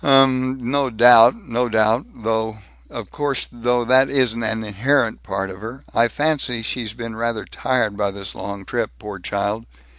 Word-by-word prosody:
"Um, 130 -1 +4
uh, - - -6
no 135 +3 0
doubt, 120 - +7
no 120 +1 0
doubt, 110 +3 +2
though 110 0 -2 0.3
Of - - -8
course, 145 -3 -2
though, 120 0 0
that 130 +2 +4
isn't 125 -4 +1
an 110 0 -2
inherent 115 +4 0
part 95 0 -4
of 95 +1 -11
her. 115 +5 -8
I 115 +1 +4
fancy 135 -3 -1
she's 110 -2 -3
been 115 -2 -6
rather 115 -1 -2
tired 125 -5 -1
by 100 -1 0
this 100 0 -6
long 100 -1 -7
trip, - - -2
poor 105 +2 -8
child. 100 +4 -3
115 Hz, 175 wpm, -21 LUFS, 110-130 Hz, 0.3 s, doubt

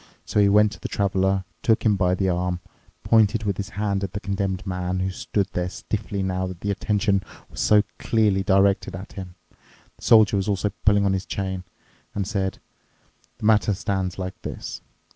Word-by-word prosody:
So - - 0
he 100 -1 +5
went 105 +1 +5
to - - -10
the - - -4
Traveler, 95 -1 +1 0.2
took 115 -1 +2
him 105 -2 +4
by 90 -2 +2
the 95 +1 0
arm, 90 0 0 0.4
pointed 110 0 +3
with 100 -3 -1
his 100 - -4
hand 100 -1 0
at 95 - -4
the 105 - -3
Condemned 95 -1 -2
Man, 90 -1 -2
who 95 +1 -1
stood 105 -1 -1
there 90 0 -1
stiffly 100 0 -4
now 95 0 -1
that 90 -2 -8
the 100 - -1
attention 100 0 +1 0.3
was - - -9
so 105 -1 +5 0.2
clearly 105 -4 +2
directed 95 +1 +2
at 95 +2 -9
him—the 90 -2 -14
Soldier 110 -3 +6
was 95 +1 -1
also 100 0 0
pulling 100 -1 +5
on 95 - +2
his 95 0 -3
chain—and 95 +1 -6
said, 95 -3 -1 0.8
"The - - -6
matter 105 -1 +4
stands 95 -1 -2
like 95 0 -5
this. - - -6
100 Hz, 180 wpm, -24 LUFS, 95-105 Hz, 0.8 s, Soldier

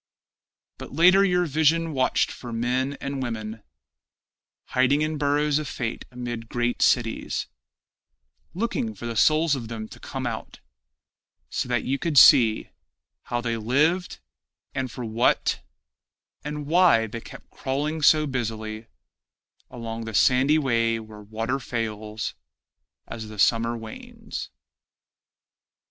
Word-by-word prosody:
But - - -9
later 180 +6 +6
your 180 -2 +2
vision 160 +2 +2
watched 130 -2 +1
for 120 - -8
men 125 +4 -1
and 140 -1 -4
women 110 -3 -5 1.1
Hiding 135 +4 +3
in 155 -1 -2
burrows 145 +1 +2
of 155 - -5
fate 115 -3 -4
amid 120 -2 -6
great 120 0 -1
cities, 115 -3 +1 1.1
Looking 230 +2 -2
for - - -9
the 115 -1 -4
souls 155 +6 +4
of 120 -4 -6
them 110 -1 -6
to - - -12
come - - -5
out, - - -5 0.9
So - - -2
that 120 -2 0
you 135 +1 -1
could 165 -4 -1
see 115 -3 +7 0.5
How 120 0 -2
they 115 -1 -2
lived, 150 +11 +1 0.6
and 130 -1 -2
for 125 - -6
what, 115 +2 +1 0.8
And 150 0 -5
why 165 -8 +4
they 115 +1 -7
kept - - -13
crawling 150 +4 -2
so 155 +1 +5
busily 110 -4 -4 0.8
Along 115 -1 -6
the 110 -1 -5
sandy 135 +6 +4
way 115 -5 +1
where 110 -1 -11
water 115 +5 -3
fails 110 -3 -4 0.7
As 110 -1 -7
the 105 0 -10
summer 115 +3 +2
wanes. 110 -1 -8
125 Hz, 125 wpm, -25 LUFS, 115-150 Hz, 1.1 s, see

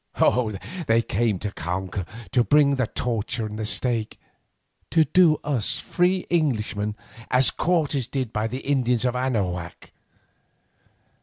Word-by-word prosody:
They 115 +1 +3
came 110 -2 0
to 105 +3 -4
conquer, 90 +1 -4 0.3
to 120 - +3
bring 145 +2 +4
us - - +1
to - - +3
the - - -1
torture 115 0 -2
and 105 0 -6
the 110 - -2
stake—to 120 +7 -2
do 175 -3 +5
to - - -13
us 135 -8 0
free 180 +1 0
Englishmen 110 -10 0 0.3
as 130 +1 +6
Cortes 150 -7 0
did 130 -5 -3
by 105 +1 -1
the 130 +4 -5
Indians 125 -4 +1
of 125 0 0
Anahuac. 95 -9 -3
120 Hz, 140 wpm, -24 LUFS, 105-140 Hz, 0.3 s, as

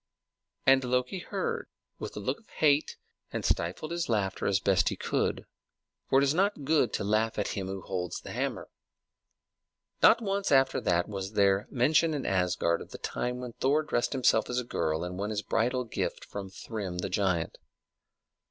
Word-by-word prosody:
And 135 0 +6
Loki 125 +8 0
heard, 465 - -3 0.3
with - - -6
a - - -2
look - - -2
of 225 - -27
hate, 150 -1 +2 0.3
and - - -3
stifled 90 - -1
his 170 -3 -2
laughter 100 -4 0
as 100 -1 +3
best 100 -2 +3
he - - -3
could; - - -1 0.6
for 135 - +4
it - - +3
is 140 +1 +3
not 195 -2 +1
good 140 -5 +3
to - - -1
laugh 110 +2 +1
at 105 - 0
him 95 -2 -3
who 95 0 -5
holds 90 -3 -3
the - - -9
hammer. - - -3 1.3
Not - - +7
once 200 -3 -1
after 135 -1 +4
that 85 0 +1
was 95 -1 -5
there 100 0 +3
mention 150 +5 +3
in 140 - -3
Asgard 90 -3 +1
of - - -10
the - - -8
time 125 0 -3
when 125 -2 -6
Thor 145 +6 +2
dressed 140 -3 0
him 130 - -2
as 125 - +3
a - - -2
girl 80 -8 -1
and 90 +1 -5
won 100 +1 -2
his 110 0 -2
bridal 125 +3 +1
gift 115 - -3
from 100 -1 -6
Thrym 95 -2 -5
the 90 - -2
giant. 90 -4 0
115 Hz, 185 wpm, -29 LUFS, 95-140 Hz, 1.3 s, Not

